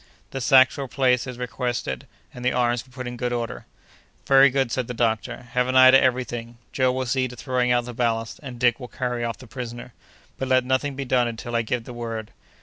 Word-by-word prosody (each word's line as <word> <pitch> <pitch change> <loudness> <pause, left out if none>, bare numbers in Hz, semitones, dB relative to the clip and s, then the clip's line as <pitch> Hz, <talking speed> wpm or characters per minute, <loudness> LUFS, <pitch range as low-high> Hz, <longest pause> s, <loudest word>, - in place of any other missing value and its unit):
The 135 - -4
sacks 130 +2 +5
were 140 -1 -4
placed 125 -1 +1
as 125 -1 -6
requested, 125 - -3 0.3
and 125 - -9
the 125 - +2
arms 120 -1 +1
were 130 - -23
put 130 0 -7
in 120 0 -6
good 125 +1 -2
order. 120 -1 -4 0.6
"Very 135 0 +7
good!" 135 -2 0
said 125 -1 -1
the 125 - -5
doctor. 120 +1 -1
"Have 125 +1 +1
an 130 - -1
eye 130 0 +9
to 135 - +7
every 130 0 +2
thing. 120 -1 -7 0.2
Joe 130 -1 +2
will 130 0 -2
see 130 +1 0
to 125 - -10
throwing 125 0 0
out 120 -1 +2
the 125 - -7
ballast, 115 -1 -1
and 130 -4 -8
Dick 120 0 +3
will 125 - -7
carry 125 -1 -3
off 115 -1 -3
the 130 - -13
prisoner; 120 +1 -8 0.5
but 135 - -2
let 130 -1 +3
nothing 130 +2 0
be 135 0 -4
done 125 -1 +2
until 120 +1 -5
I 115 - +3
give 115 +1 -2
the 125 - -9
word. 115 -2 -5
125 Hz, 240 wpm, -24 LUFS, 120-130 Hz, 0.6 s, eye